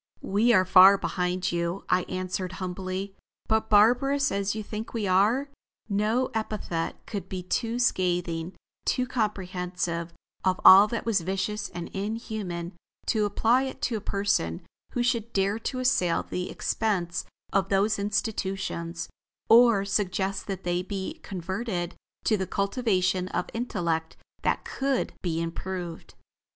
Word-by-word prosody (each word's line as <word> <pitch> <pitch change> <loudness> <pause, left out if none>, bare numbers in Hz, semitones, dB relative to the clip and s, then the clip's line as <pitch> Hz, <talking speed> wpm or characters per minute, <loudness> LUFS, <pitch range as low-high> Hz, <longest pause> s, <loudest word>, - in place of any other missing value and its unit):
"We 215 +5 +3
are 185 -5 +5
far 190 +2 +8
behind 180 -1 -1
you," 170 +2 -2
I 185 - +3
answered 185 0 -3
humbly. 185 +1 -4 0.3
"But 220 0 +1
barbarous 250 +7 +4
as 200 +1 -1
you 215 - -3
think 215 +2 -6
we 220 -3 -1
are, 215 +9 +2 0.4
no 215 +5 +1
epithet 210 -7 -3
could 200 -3 -5
be 185 -1 -4
too 230 +5 -1
scathing, 180 -6 0 0.3
too 255 - +1
comprehensive 180 -7 -2 0.3
of 185 -1 +1
all 195 +2 +10
that 230 +1 -3
was 220 -5 +2
vicious 195 +4 -2
and 175 -1 -6
inhuman, 200 -4 -4 0.3
to 215 -2 +2
apply 245 +6 +2
to 235 - -2
a 215 - -3
person 200 - 0 0.3
who 245 - +1
should 235 -1 0
dare 200 +2 +1
to 255 - -3
assail 250 -10 +2
the 180 0 -4
expense 185 -6 -1 0.3
of 195 0 +2
those 200 +2 +2
institutions, 190 -5 -2 0.4
or 230 -4 +6
suggest 195 -1 -1
that 195 -2 -4
they 175 0 0
be 195 - -5
converted 190 0 -3 0.3
to 215 - +2
the 190 -1 -2
cultivation 190 -3 0
of 180 - -3
intellect 170 -9 -2 0.2
that - - 0
could 270 -1 -1
be 165 -3 -1
improved." 170 0 -5
195 Hz, 135 wpm, -27 LUFS, 180-220 Hz, 0.4 s, all